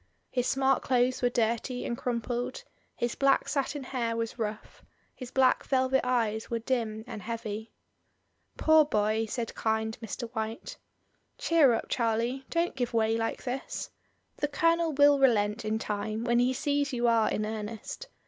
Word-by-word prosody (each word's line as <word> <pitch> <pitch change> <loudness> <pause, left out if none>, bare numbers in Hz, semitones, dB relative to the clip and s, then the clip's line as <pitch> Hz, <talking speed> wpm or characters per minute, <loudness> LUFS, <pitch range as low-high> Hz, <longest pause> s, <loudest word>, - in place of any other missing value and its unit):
His 250 -1 0
smart 270 0 +2
clothes 255 0 +1
were 245 - +3
dirty 235 +2 -1
and 235 - -2
crumpled, 240 0 -3 0.3
his 240 0 -1
black 275 0 +2
satin 280 0 -1
hair 235 -3 -2
was 230 +1 -3
rough, 215 -1 -5 0.3
his 255 -2 -8
black 260 0 +3
velvet 260 0 +2
eyes 225 -3 0
were 235 - 0
dim 225 -2 -2
and 220 -4 -7
heavy. 220 0 -5 0.9
"Poor 315 -1 +6
boy!" 215 -4 0
said 230 0 -3
kind 220 0 -1
Mr. 230 +2 -5
WTiite. 225 -1 -5 0.6
"Cheer 315 -7 +4
up, 225 - -1
Charlie, 235 +3 0
don't 340 +1 0
give 245 -2 -2
way 225 0 +2
like 225 0 -2
this. 260 +1 -4 0.5
The 295 - 0
Colonel 330 +2 +2
will 285 0 +5
relent 225 -4 +3
in 215 +1 0
time 215 +1 -3
when 240 0 +2
he 250 +1 +3
sees 285 +2 0
you 240 -2 +1
are 230 -2 +4
in 215 - -1
earnest. 220 - -6
240 Hz, 160 wpm, -29 LUFS, 220-265 Hz, 0.9 s, Poor